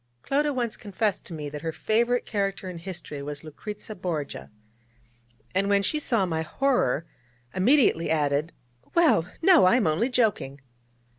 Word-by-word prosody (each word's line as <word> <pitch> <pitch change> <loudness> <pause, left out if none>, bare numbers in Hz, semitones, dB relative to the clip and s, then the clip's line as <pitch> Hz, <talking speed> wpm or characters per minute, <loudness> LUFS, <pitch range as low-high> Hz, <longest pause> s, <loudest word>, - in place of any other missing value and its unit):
Clodagh 290 +1 +1
once 240 -3 -2
confessed 205 0 -2
to 175 - -7
me 150 -2 -5
that 145 0 -7
her 160 - -2
favourite 235 +7 +1
character 195 -2 -2
in 180 -2 -6
history 170 -5 -7
was 145 +1 -6
Lucrezia 210 +7 -8
Borgia, 170 -6 -4 1.0
and 195 +2 +1
when 200 0 +3
she 305 - 0
saw 230 -9 +1
my 160 -3 -1
horror, 165 - +1 0.5
immediately 215 - +3
added: 150 0 +1 0.4
'Well, 305 - +4
no, 345 - +7
I 185 - +5
am 245 -5 +2
only 165 +11 +1
joking!' 215 - 0
190 Hz, 150 wpm, -26 LUFS, 160-235 Hz, 1.0 s, no